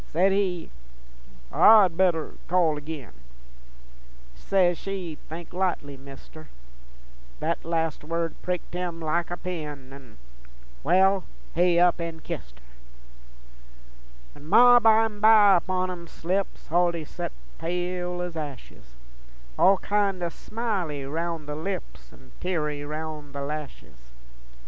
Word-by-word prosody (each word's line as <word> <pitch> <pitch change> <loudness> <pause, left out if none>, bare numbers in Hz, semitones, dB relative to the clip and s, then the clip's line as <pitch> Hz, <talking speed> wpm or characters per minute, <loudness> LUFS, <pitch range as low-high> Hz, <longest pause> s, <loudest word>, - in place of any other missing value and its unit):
Says 185 +5 +2
he, 185 -4 -1 0.8
'I'd 205 -6 +7
better 175 -3 +1
call 170 -3 +3
agin:' 150 -4 -7 1.2
Says 180 - +2
she, 185 -5 -5
'Think 165 +2 -8
likely, 175 -6 -1
Mister:' 140 +3 -13 0.9
Thet - - -2
last 165 -2 -1
word 165 +1 -2
pricked 180 -1 -4
him 175 -2 -3
like 165 +1 -1
a 175 - -4
pin, 150 -7 -6
An'... 135 -5 -14 0.7
Wal, 190 +3 +4 0.3
he 175 0 +3
up 175 -1 +4
an' 165 -1 -5
kist - - -7
her. - - -24 1.7
When 145 - -14
Ma 245 +3 +8
bimeby 220 -2 +5
upon 185 +1 -1
'em 170 -1 -8
slips, 190 +5 -3
Huldy 170 -1 +1
sot - - -5 0.3
pale 180 +1 -2
ez 175 -2 -6
ashes, 135 - -8 0.6
All 195 - +5
kin' 200 -2 0
o' 170 - 0
smily 185 - -3
roun' 165 +2 -3
the 150 - -5
lips 160 - -6
An' 65 0 -18
teary 150 -5 -2
roun' 150 -1 -6
the 140 - -5
lashes. 135 - -8
170 Hz, 120 wpm, -26 LUFS, 150-185 Hz, 1.7 s, Ma